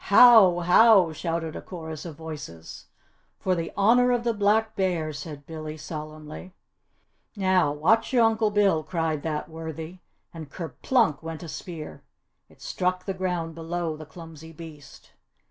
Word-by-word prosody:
"How! 200 Hz, -4 st, +7 dB
How!" 180 Hz, -1 st, +5 dB
shouted 165 Hz, 0 st, -3 dB
a -, -, -6 dB
chorus 160 Hz, -3 st, -8 dB
of 165 Hz, -3 st, -7 dB
voices. 145 Hz, -, -9 dB, 0.5 s
"For 185 Hz, -, 0 dB
the 165 Hz, -2 st, -3 dB
Honour 245 Hz, +5 st, +4 dB
of 240 Hz, -1 st, 0 dB
the 235 Hz, -1 st, +1 dB
Black 215 Hz, +1 st, +1 dB
Bears!" 165 Hz, -6 st, -1 dB
said 145 Hz, -3 st, -9 dB
Billy 155 Hz, -1 st, -7 dB
solemnly. 155 Hz, +3 st, -9 dB, 0.8 s
"Now, 185 Hz, -6 st, +2 dB
watch 180 Hz, +10 st, +2 dB
your 245 Hz, -3 st, +4 dB
Uncle 220 Hz, -1 st, +2 dB
Bill!" 200 Hz, -6 st, +2 dB
cried 160 Hz, -2 st, -2 dB
that 155 Hz, -1 st, -3 dB
worthy, 160 Hz, +2 st, -8 dB, 0.3 s
and 160 Hz, -4 st, -9 dB
kerplunk 170 Hz, -, 0 dB
went 165 Hz, 0 st, -7 dB
a -, -, -7 dB
spear! 160 Hz, -1 st, -8 dB, 0.5 s
It -, -, -18 dB
struck 185 Hz, 0 st, -2 dB
the 195 Hz, -, -2 dB
ground 180 Hz, -3 st, -3 dB
below 165 Hz, 0 st, -4 dB
the 155 Hz, -1 st, -11 dB
clumsy 160 Hz, -1 st, -12 dB
beast. 155 Hz, -3 st, -13 dB
165 Hz, 145 wpm, -25 LUFS, 155-190 Hz, 0.8 s, How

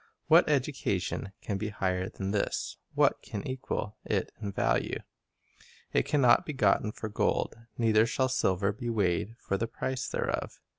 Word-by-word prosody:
What -, -, +6 dB
education 95 Hz, -, 0 dB
can 100 Hz, -2 st, -2 dB
be 105 Hz, +1 st, -2 dB
higher 95 Hz, -2 st, -1 dB
than 95 Hz, 0 st, -4 dB
this? 100 Hz, -1 st, -1 dB, 0.2 s
What -, -, +3 dB
can 100 Hz, -, -6 dB
equal 130 Hz, -5 st, -3 dB
it -, -, -1 dB
in 100 Hz, -2 st, -3 dB
value? -, -, 0 dB, 0.9 s
"It -, -, +2 dB
can 145 Hz, -, +2 dB
not 120 Hz, -2 st, +6 dB
be 150 Hz, -, -5 dB
gotten 105 Hz, -3 st, +3 dB
for 110 Hz, -, -5 dB
gold, 105 Hz, -, 0 dB, 0.2 s
Neither 110 Hz, -1 st, +4 dB
shall 130 Hz, +2 st, +1 dB
silver 100 Hz, -5 st, +2 dB
be 120 Hz, +3 st, -5 dB
weighed 105 Hz, 0 st, 0 dB
for 100 Hz, -, -2 dB
the 115 Hz, -, -1 dB
price 130 Hz, +2 st, -3 dB
thereof. -, -, -2 dB
105 Hz, 160 wpm, -30 LUFS, 100-115 Hz, 0.9 s, What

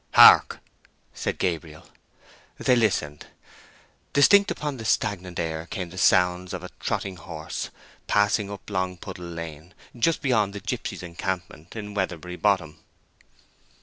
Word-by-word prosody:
"Hark!" -, -, +9 dB, 0.6 s
said -, -, -3 dB
Gabriel. 80 Hz, -3 st, -3 dB, 0.7 s
They 125 Hz, -, +3 dB
listened. 90 Hz, -11 st, 0 dB, 0.9 s
Distinct 200 Hz, +8 st, +6 dB
upon 145 Hz, -3 st, -3 dB
the 115 Hz, -, -7 dB
stagnant 95 Hz, -5 st, -1 dB
air 80 Hz, -1 st, -3 dB
came 90 Hz, -1 st, -5 dB
the 95 Hz, -, -10 dB
sounds 90 Hz, 0 st, +3 dB
of -, -, -7 dB
a -, -, -8 dB
trotting 95 Hz, -2 st, -2 dB
horse 80 Hz, -2 st, -6 dB, 0.4 s
passing 105 Hz, 0 st, +2 dB
up 100 Hz, -1 st, -9 dB
Longpuddle 95 Hz, -1 st, -4 dB
Lane—just 85 Hz, -, -3 dB
beyond 110 Hz, -7 st, +2 dB
the 100 Hz, -, -5 dB
gipsies' 90 Hz, -, -4 dB
encampment 90 Hz, -1 st, -5 dB
in 105 Hz, -2 st, -6 dB
Weatherbury 90 Hz, -3 st, -3 dB
Bottom. 85 Hz, -7 st, +1 dB
95 Hz, 120 wpm, -25 LUFS, 85-105 Hz, 0.9 s, Hark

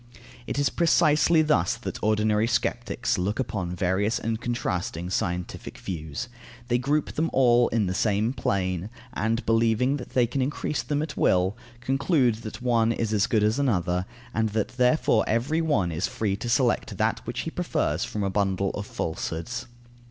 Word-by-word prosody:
It -, -, -3 dB
is 145 Hz, -1 st, +2 dB
precisely 160 Hz, -1 st, +4 dB
thus 145 Hz, -, +2 dB
that -, -, -6 dB
ordinary 110 Hz, 0 st, +2 dB
sceptics 120 Hz, -1 st, -1 dB
look 100 Hz, +6 st, -1 dB
upon 90 Hz, -8 st, -2 dB
various 95 Hz, +5 st, +1 dB
and 115 Hz, 0 st, -3 dB
contrasting 90 Hz, -7 st, -2 dB
scientific 90 Hz, 0 st, -3 dB
views. 85 Hz, +5 st, -5 dB, 0.4 s
They 120 Hz, 0 st, +2 dB
group 145 Hz, +4 st, 0 dB
them 165 Hz, +2 st, 0 dB
all 120 Hz, -2 st, +4 dB
in 110 Hz, -2 st, +1 dB
the 90 Hz, -, -1 dB
same 105 Hz, +4 st, +1 dB
plane, 95 Hz, -5 st, -1 dB, 0.2 s
and 115 Hz, +2 st, -1 dB
believing 115 Hz, +4 st, +2 dB
that 125 Hz, -, -9 dB
they 125 Hz, -2 st, +5 dB
can 130 Hz, +3 st, -2 dB
increase 145 Hz, +2 st, -1 dB
them 150 Hz, 0 st, -1 dB
at 155 Hz, -3 st, -6 dB
will, 90 Hz, +2 st, +2 dB, 0.3 s
conclude 135 Hz, -2 st, +2 dB
that 110 Hz, +2 st, -8 dB
one 115 Hz, -2 st, +3 dB
is 115 Hz, -1 st, -1 dB
as 105 Hz, +2 st, +2 dB
good 110 Hz, -4 st, +2 dB
as 110 Hz, +5 st, +2 dB
another, 90 Hz, -8 st, 0 dB, 0.3 s
and 110 Hz, -1 st, +1 dB
that 110 Hz, -, 0 dB
therefore 125 Hz, -2 st, +3 dB
every 130 Hz, +9 st, +1 dB
one 105 Hz, -, +1 dB
is 80 Hz, +3 st, -1 dB
free 105 Hz, -3 st, -1 dB
to 120 Hz, -, -5 dB
select 125 Hz, 0 st, +1 dB
that -, -, +1 dB
which -, -, -3 dB
he -, -, -4 dB
prefers 75 Hz, +4 st, -1 dB
from 105 Hz, -, -3 dB
a 95 Hz, -, 0 dB
bundle 95 Hz, -1 st, 0 dB
of 100 Hz, 0 st, -5 dB
falsehoods. 85 Hz, +8 st, -4 dB
110 Hz, 170 wpm, -26 LUFS, 95-125 Hz, 0.4 s, they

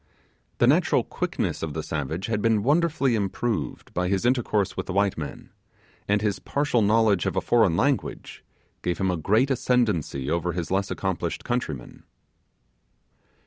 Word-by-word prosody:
The -, -, +4 dB
natural -, -, +3 dB
quickness -, -, -3 dB
of 80 Hz, -2 st, -4 dB
the 80 Hz, -, -3 dB
savage 80 Hz, +5 st, -3 dB
had 110 Hz, -2 st, -1 dB
been 110 Hz, -2 st, +2 dB
wonderfully 145 Hz, -2 st, +2 dB
improved 110 Hz, +2 st, -2 dB
by 90 Hz, 0 st, 0 dB
his 95 Hz, +3 st, 0 dB
intercourse 120 Hz, -5 st, +1 dB
with -, -, -4 dB
the 95 Hz, -, -3 dB
white 100 Hz, 0 st, +2 dB
men, 75 Hz, -3 st, -7 dB, 0.6 s
and 105 Hz, +1 st, +1 dB
his 105 Hz, -3 st, 0 dB
partial 140 Hz, -4 st, 0 dB
knowledge 105 Hz, -2 st, +3 dB
of -, -, -2 dB
a -, -, +3 dB
foreign 110 Hz, -8 st, +3 dB
language 140 Hz, -1 st, -1 dB, 0.4 s
gave 90 Hz, -, -1 dB
him 95 Hz, -1 st, +1 dB
a -, -, 0 dB
great 110 Hz, -, +2 dB
ascendancy 105 Hz, -, 0 dB
over 85 Hz, +2 st, 0 dB
his 85 Hz, 0 st, -4 dB
less 95 Hz, +1 st, 0 dB
accomplished 90 Hz, -3 st, -3 dB
countrymen. 100 Hz, -, -4 dB
100 Hz, 155 wpm, -25 LUFS, 85-120 Hz, 0.6 s, The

